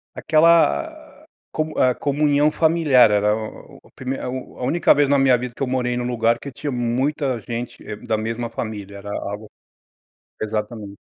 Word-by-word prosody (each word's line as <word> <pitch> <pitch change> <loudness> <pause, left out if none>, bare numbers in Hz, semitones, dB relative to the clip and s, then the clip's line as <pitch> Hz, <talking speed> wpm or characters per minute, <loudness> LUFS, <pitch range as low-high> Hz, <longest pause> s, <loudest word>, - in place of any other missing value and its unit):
Aquela 160 - +4
a - - -17 0.2
comu 155 0 -3
hã, 130 -1 +4
comunhão 145 +1 +2
familiar 155 -8 +4
era 105 0 +2
o 110 -1 -8
o - - -20
a - - -25
primeira 130 +1 -4
a - - -3
u 130 0 -7
a - - -5
única 155 +6 +4
vez 145 -1 +2
na 140 - +4
minha 130 -2 +4
vida 125 0 -6
que - - -14
eu - - -1
morei 125 -1 -1
em 120 - -2
um - - -3
lugar 115 -1 +1
que 140 - -8
tinha 145 +3 -5
muita 130 +2 -1
gente 120 +2 -6
é 105 - -5
da 110 +1 -2
mesma 115 +2 -3
família, 105 -3 -6
era 100 +1 -9
algo 105 +1 -5 0.9
exatamente. 105 -1 -4
125 Hz, 195 wpm, -21 LUFS, 110-140 Hz, 0.9 s, Aquela